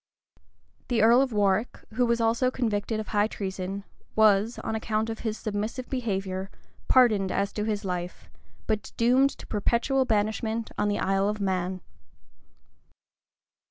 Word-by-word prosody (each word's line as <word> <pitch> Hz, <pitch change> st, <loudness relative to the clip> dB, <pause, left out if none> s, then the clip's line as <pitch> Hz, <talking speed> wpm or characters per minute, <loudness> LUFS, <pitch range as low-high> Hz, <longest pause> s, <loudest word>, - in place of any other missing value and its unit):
The 235 Hz, -4 st, +2 dB
earl 235 Hz, +3 st, +6 dB
of 270 Hz, -2 st, 0 dB
Warwick, 205 Hz, +1 st, +1 dB, 0.2 s
who 245 Hz, +1 st, +2 dB
was 235 Hz, 0 st, +1 dB
also 230 Hz, +3 st, +2 dB
convicted 220 Hz, -3 st, -1 dB
of 215 Hz, -, -5 dB
high 210 Hz, 0 st, +2 dB
treason, 195 Hz, -1 st, -5 dB, 0.3 s
was, 215 Hz, +1 st, +4 dB
on 220 Hz, -, -2 dB
account 220 Hz, 0 st, -1 dB
of 225 Hz, -, -6 dB
his 220 Hz, -1 st, -3 dB
submissive 215 Hz, +4 st, -4 dB
behavior, 195 Hz, -6 st, -2 dB, 0.4 s
pardoned 215 Hz, -7 st, +4 dB
as 200 Hz, +1 st, -1 dB
to 210 Hz, -, -2 dB
his 210 Hz, -2 st, -2 dB
life, 180 Hz, -1 st, -4 dB, 0.4 s
but 215 Hz, -1 st, -2 dB
doomed 255 Hz, +4 st, +4 dB
to -, -, -11 dB
perpetual 235 Hz, +5 st, +1 dB
banishment 220 Hz, 0 st, -1 dB
in 210 Hz, -, +2 dB
the 205 Hz, -, 0 dB
Isle 195 Hz, +1 st, +1 dB
of 210 Hz, 0 st, -3 dB
Man. 185 Hz, -2 st, -1 dB
215 Hz, 145 wpm, -27 LUFS, 200-230 Hz, 0.4 s, earl